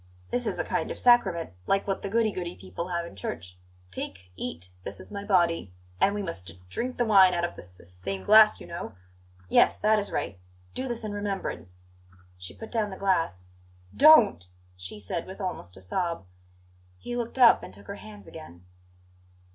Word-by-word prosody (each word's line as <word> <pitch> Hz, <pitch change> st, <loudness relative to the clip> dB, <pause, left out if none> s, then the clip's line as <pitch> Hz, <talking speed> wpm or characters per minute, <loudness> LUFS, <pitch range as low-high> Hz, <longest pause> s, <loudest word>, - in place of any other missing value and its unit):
"This 245 Hz, 0 st, 0 dB
is -, -, -1 dB
a -, -, 0 dB
kind -, -, -2 dB
of -, -, -5 dB
sacrament, 190 Hz, -9 st, +4 dB, 0.2 s
like 195 Hz, 0 st, +2 dB
what 195 Hz, -1 st, -2 dB
the 200 Hz, -, -4 dB
goody 225 Hz, +1 st, +2 dB
goody 175 Hz, -3 st, -5 dB
people 95 Hz, -, -6 dB
have 170 Hz, -1 st, -2 dB
in 170 Hz, -, -11 dB
church. 90 Hz, -1 st, -6 dB, 0.3 s
'Take, 90 Hz, 0 st, -7 dB
eat; 90 Hz, -5 st, -6 dB
this 100 Hz, -, -7 dB
is -, -, -10 dB
my 200 Hz, -1 st, -5 dB
body.' 170 Hz, -, +2 dB, 0.3 s
And 200 Hz, -, +3 dB
we 205 Hz, -, -2 dB
must 165 Hz, -, -5 dB
d 85 Hz, +2 st, -10 dB
drink 250 Hz, -, -3 dB
the 240 Hz, -, +2 dB
wine 190 Hz, -4 st, +6 dB
out 170 Hz, -, -1 dB
of 175 Hz, -, -5 dB
the -, -, -9 dB
s 90 Hz, 0 st, -13 dB
s 85 Hz, -, -13 dB
same 95 Hz, +1 st, -5 dB
glass, 215 Hz, -, +7 dB
you -, -, -10 dB
know 170 Hz, -, -7 dB, 0.5 s
yes, -, -, +4 dB
that 215 Hz, +1 st, +3 dB
is 205 Hz, -, -5 dB
right. 95 Hz, -, -3 dB, 0.3 s
'Do 260 Hz, -, -3 dB
this 240 Hz, -2 st, -2 dB
in 215 Hz, -, -3 dB
remembrance 195 Hz, -, -4 dB, 0.3 s
'" 90 Hz, 0 st, -27 dB
She 90 Hz, -, -8 dB
put 220 Hz, -, -9 dB
down 220 Hz, -3 st, 0 dB
the 190 Hz, -, -8 dB
glass. 165 Hz, -, 0 dB, 0.5 s
"Don't!" 240 Hz, -, +7 dB, 0.3 s
she 90 Hz, +3 st, -8 dB
said, 105 Hz, -, -4 dB
with 190 Hz, +2 st, -9 dB
almost 180 Hz, -, -5 dB
a -, -, -12 dB
sob. 170 Hz, -, -2 dB, 0.7 s
He 240 Hz, -, -6 dB
looked 240 Hz, +1 st, -4 dB
up, 245 Hz, -3 st, +7 dB
and -, -, -9 dB
took 100 Hz, +1 st, -13 dB
her 200 Hz, -, -7 dB
hands 210 Hz, -1 st, -12 dB
again. 90 Hz, -, -12 dB
175 Hz, 205 wpm, -27 LUFS, -, 0.7 s, glass